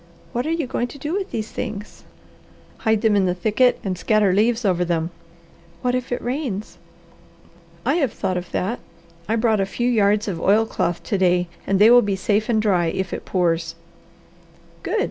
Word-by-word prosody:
What 245 +4 -1
are - - 0
you 330 -3 0
going 245 -1 -2
to 280 - -11
do 295 +4 -4
with 390 0 -2
these 220 -1 -4
things?" 210 -3 -6 0.7
"Hide 220 -1 +1
them 220 -2 +4
in 195 -2 +3
the 180 - 0
thicket 220 +7 +2
and 190 -3 -2
scatter 200 +2 +2
leaves 225 +3 +2
over 180 -2 +2
them." 170 -1 -1 0.7
"What 250 0 +1
if 255 0 -2
it 245 - -2
rains?" 245 -5 -4 1.1
"I - - +2
have 275 -9 +1
thought 190 -3 -2
of 180 0 -4
that. 225 +7 -2 0.5
I 225 - +2
brought 225 -2 +2
a - - +1
few 240 +5 -2
yards 210 -3 +2
of 175 -5 -3
oilcloth 200 -4 +1
to 200 - -1
day 180 -1 +2 0.2
and 195 - +2
they 215 +4 +7
will 245 0 +8
be 205 -3 -1
safe 210 +3 0
and 225 -2 +3
dry 190 -6 +2
if 190 +2 -2
it - - -5
pours." 165 -2 0 1.1
"Good!" - - -1
210 Hz, 190 wpm, -22 LUFS, 185-240 Hz, 1.1 s, will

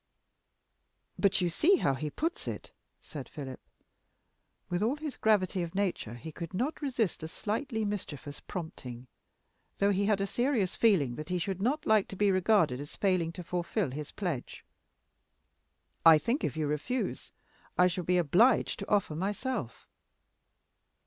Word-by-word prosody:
"But 200 -1 +3
you 175 -1 +1
see 365 - +4
how 140 - +2
he 150 +3 -3
puts 330 - -3
it," - - -5 0.3
said 145 -4 -8
Philip. 135 -3 -7 1.1
With 175 +1 -1
all 230 +6 +2
his 300 -2 -5
gravity 195 -4 +2
of 170 0 -5
nature 185 - -1
he 160 +7 -8
could 170 +3 -7
not 260 +12 -1
resist 240 - -1
a 160 - -4
slightly 220 - -2
mischievous 160 -8 -5
prompting, 130 -8 -7 0.7
though 200 +1 +3
he 200 +1 +1
had 210 -2 +3
a 195 - +1
serious 240 -3 0
feeling 160 - +3
that 155 +1 -6
he 180 - 0
should 190 +2 -3
not 280 +8 0
like 215 -2 +4
to - - -8
be 205 +1 +3
regarded 185 - +3
as 145 - -9
failing 185 -4 +1
to 180 - -7
fulfill 175 - -1
his 150 +2 -5
pledge. 175 - -4 1.4
"I 165 -1 +9
think 235 - -1
if - - -1
you 155 - 0
refuse, 150 - -2 0.5
I 180 - +6
shall 180 0 0
be 180 +2 +2
obliged 180 - +4
to - - -6
offer 200 -6 +2
myself." 205 - -3
185 Hz, 155 wpm, -30 LUFS, 160-215 Hz, 1.4 s, I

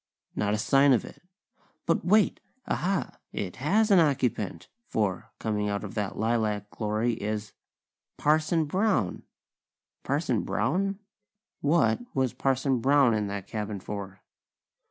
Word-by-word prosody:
Not 105 0 +1
a - - -1
sign 135 +6 +4
of 120 - +1
it. - - -13 0.6
But 165 - +1
wait! 205 +4 +3 0.3
Aha! 195 +1 -1
It 90 -3 -4
has 205 - +2
an 195 - +7
occupant, 125 - 0 0.2
for, 100 -4 -1
coming 105 -2 -1
out 100 0 -2
of 100 - -6
that 105 -3 -3
lilac 110 -2 0
glory 110 +2 -1
is 105 -2 -4 0.6
Parson 155 +2 +2
Brown!! 185 - 0 0.8
Parson 135 - 0
Brown? 150 - 0 0.6
What 140 -8 +3 0.2
was 130 -3 +1
Parson 135 0 +1
Brown 135 -1 +4
in 105 -1 0
that 100 -1 -5
cabin 105 -2 -4
for? 95 -1 -7
115 Hz, 130 wpm, -27 LUFS, 105-145 Hz, 0.8 s, an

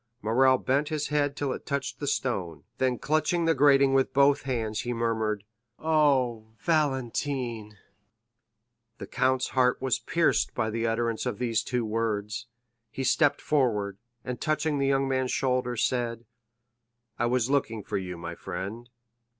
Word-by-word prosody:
Morrel 130 +4 +4
bent 140 +4 0
his 150 -1 -2
head 145 -1 +1
till 140 -2 -1
it - - -7
touched 140 -2 -3
the 145 - -4
stone, 90 - -2 0.2
then 130 -1 +1
clutching 155 +6 +1
the 165 - +4
grating 140 -1 +5
with 135 -1 +2
both 140 0 +5
hands, 110 -4 -1
he 120 - -2
murmured: 110 -3 -1 0.3
"Oh, 135 -8 +2
Valentine!" 130 - -1 1.2
The - - -7
count's 130 0 +1
heart 125 -1 +2
was 130 -1 0
pierced 170 -1 +1
by 110 -2 0
the 115 +1 -1
utterance 115 0 -1
of - - -2
these 115 -3 0
two 125 -1 -2
words; 105 -1 -2 0.4
he 135 - -5
stepped 145 +3 +3
forward, 105 -9 0 0.3
and 125 -1 -5
touching 155 -1 0
the 135 - +1
young 135 0 +2
man's 130 -1 0
shoulder, 125 -2 0
said: 120 -1 -1 0.9
"I 120 - +2
was 125 +1 +1
looking 115 -7 0
for - - -2
you, 90 -2 -6
my 85 0 -6
friend." 95 +7 -6
125 Hz, 150 wpm, -27 LUFS, 115-140 Hz, 1.2 s, grating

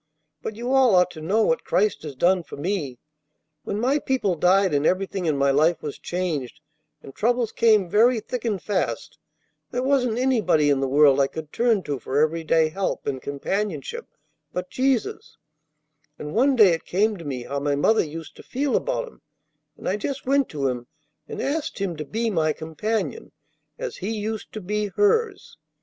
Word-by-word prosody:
But 210 - -5
you 240 +4 -3
all 260 -6 +5
ought 180 0 +4
to 155 - -10
know 205 +8 +2
what 240 +2 +1
Christ 210 +3 +1
has 150 -3 -7
done 180 +6 +3
for 165 - -11
me. 145 -5 -2 0.7
When 205 - -3
my 265 +6 +2
people 260 -9 0
died 185 +2 +3
and 145 0 +2
everything 185 +1 0
in 150 -3 +1
my 140 0 +3
life 155 +5 +2
was 150 -2 -5
changed, 155 -7 -3 0.4
and 135 - -11
troubles 240 - 0
came 215 -5 +3
very 225 +6 +4
thick 245 +2 -5
and 215 -5 -1
fast, 205 +2 -3 0.5
there 250 0 -2
wasn't 255 -4 +1
anybody 215 - +2
in 140 - +2
the 135 - 0
world 140 0 +5
I 135 - +3
could 155 +1 -8
turn 230 -5 +2
to 145 -3 -3
for 130 +4 -3
every 155 +2 +2
day 160 0 +3
help 190 +4 -3
and 135 -2 -3
companionship 195 - -3 0.4
but 180 0 -5
Jesus; 260 -3 -1 0.8
and 150 0 -7
one 265 +4 +3
day 215 -5 +7
it 165 - -1
came 210 +4 +1
to 170 - -9
me 130 -5 -4
how 140 +3 -3
my 145 0 0
mother 220 +10 +3
used 160 +1 -8
to - - -10
feel 275 +2 -1
about - - -1
Him, 460 - -16 0.6
and - - -7
I 195 - +1
just 270 +6 -4
went 275 0 +2
to 140 -3 -1
Him, 125 -2 -3 0.4
and - - -7
asked 300 +3 -2
Him 195 -4 -2
to 150 - -5
be 225 +7 -1
my 155 -4 +1
companion, 185 +7 -3 0.4
as - - -5
He 195 - -4
used 215 +1 -4
to 215 - -5
be 210 +3 -1
hers. 415 - 0
190 Hz, 190 wpm, -24 LUFS, 155-235 Hz, 0.8 s, day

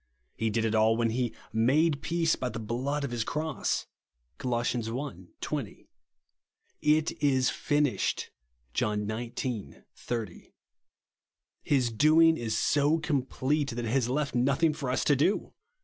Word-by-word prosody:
He 115 - 0
did 115 +1 0
it 110 - 0
all 110 +1 +4
when 115 -1 +1
he 120 0 0 0.2
" - - -36 0.2
made 155 -1 +3
peace 165 0 +1
by 125 - -3
the 115 - -6
blood 125 +7 -2
of 140 - -3
his 120 -2 -1
cross/* 155 +2 -2 0.5
(Col. 125 -2 -1
i. 120 - 0 0.8
20). - - -5 0.4
" - - -46 0.2
It 155 - -3
is 130 -3 +3
finished," 145 -3 0 0.4
(John 105 -1 0
xix. 115 +4 -4 0.6
80). 115 -7 -4 1.1
His 130 -4 +1
doing 155 +7 +5
is 115 -6 -2
so 145 +5 +3
complete 145 -1 0
that 120 -1 -3
it 110 - -2
has 125 -2 +1
left 145 +2 -1
nothing 140 +6 +2
for 140 -3 -4
us 125 - +1
to 145 - +4
do. 155 +10 +1
130 Hz, 150 wpm, -29 LUFS, 115-150 Hz, 1.1 s, doing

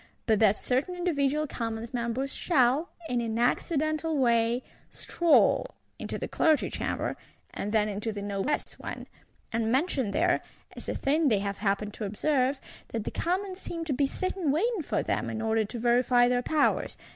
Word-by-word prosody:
—but 220 -3 +3
that 210 -2 +4
certain 265 +8 -1
individual 305 -4 +1
Commons 230 -3 -4
Members 245 +3 -2
shall, 280 0 +2 0.2
in 245 -4 0
an 225 -1 -2
accidental 310 +5 +1
way, 235 -1 +2 0.3
stroll 345 +8 +2 0.2
into - - -4
the - - -4
Clergy 315 -2 +2
Chamber, - - -2 0.4
and 205 - -3
then 215 -1 +3
into 210 +2 -3
the 205 -1 -5
Noblesse 205 +8 -2
one; - - -6 0.5
and 225 0 0
mention 265 - +1
there, 345 - +2 0.3
as - - -8
a - - -2
thing 300 +3 +2
they 220 -6 +4
have 200 0 -3
happened 205 0 -1
to 215 - -5
observe, 265 +6 +1 0.3
that 225 -2 -4
the - - -4
Commons 370 +2 -2
seem 335 -1 -5
to 300 - -1
be 275 +2 +2
sitting 370 +1 -2
waiting 395 - +1
for 295 - -1
them, - - -1
in 220 - -4
order 220 0 +1
to 235 - -7
verify 245 +1 +4
their 245 0 +2
powers. 300 +4 +1
250 Hz, 170 wpm, -28 LUFS, 225-310 Hz, 0.5 s, that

